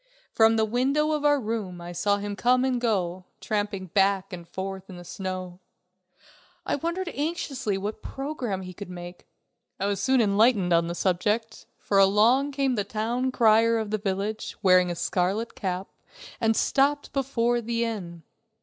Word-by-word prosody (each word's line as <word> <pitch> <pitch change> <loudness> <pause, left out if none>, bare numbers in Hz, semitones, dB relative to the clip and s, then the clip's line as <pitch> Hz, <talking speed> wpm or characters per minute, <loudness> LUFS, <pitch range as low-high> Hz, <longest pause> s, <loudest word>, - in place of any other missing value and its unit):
From 225 0 +5
the 220 -1 +2
window 270 +7 +1
of 300 -1 -1
our 290 -1 +4
room 210 -6 -4
I 175 0 -7
saw 200 +3 +1
him 205 0 -4
come 250 +5 +3
and 250 -2 0
go, 185 -6 -1
tramping 205 -2 -2
back 195 +1 +1
and 170 -1 -8
forth 190 +1 -6
in 185 - -9
the 175 - -10
snow. 185 0 -6 1.1
I - - 0
wondered 340 +4 -3
anxiously 285 - -2
what 210 +2 -5
program 260 -9 -4
he 185 0 -8
could 200 +1 -9
make. 175 0 -9 0.5
I 195 - -1
was 200 -1 -1
soon 260 +4 +3
enlightened 205 -3 +3
on 170 0 +3
this 170 0 -4
subject, 210 +5 -1
for 200 - +1
along 220 +9 +4
came 270 -1 +1
the 210 -4 0
town 230 +5 -1
crier 230 -1 +4
of 220 -2 -3
the 215 - 0
village, 200 +2 -3
wearing 185 -1 +5
a 175 - -2
scarlet 190 +6 -1
cap, 185 -1 -3 0.5
and 225 -1 +2
stopped 285 +1 +1
before 240 -3 0
the 235 +1 -1
inn. 175 -7 -6
210 Hz, 170 wpm, -26 LUFS, 190-240 Hz, 1.1 s, From